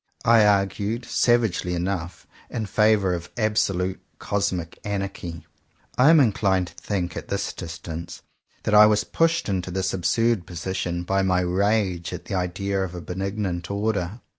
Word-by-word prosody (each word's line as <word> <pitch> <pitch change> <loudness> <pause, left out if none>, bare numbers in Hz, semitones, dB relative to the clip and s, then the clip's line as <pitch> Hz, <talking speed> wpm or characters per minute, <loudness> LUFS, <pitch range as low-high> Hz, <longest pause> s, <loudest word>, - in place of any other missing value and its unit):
I 115 -1 +6
argued, 100 +3 0
savagely 110 -7 +1
enough, 90 -1 -3 0.2
in 110 - -3
favour 105 -3 +3
of 85 0 -5
absolute 95 -4 0 0.2
cosmic 95 -5 -2
anarchy. 95 -5 -4 0.5
I 130 +4 +5
am 165 -1 +7
inclined 95 -7 +2
to - - -18
think, 90 -5 -3
at - - -6
this - - -2
distance, 85 0 -7 0.4
that 105 - -1
I 105 0 +9
was 105 0 +2
pushed 165 +1 +1
into 95 -3 -2
this 95 +1 -1
absurd 110 +2 +1
position 85 0 -3
by 95 +2 +1
my 90 -1 +2
rage 95 -1 0
at - - -7
the - - -6
idea 95 +2 -1
of 90 -2 -4
a 90 - -6
benignant 95 -1 -3
order. 100 0 -2
95 Hz, 150 wpm, -24 LUFS, 90-105 Hz, 0.5 s, I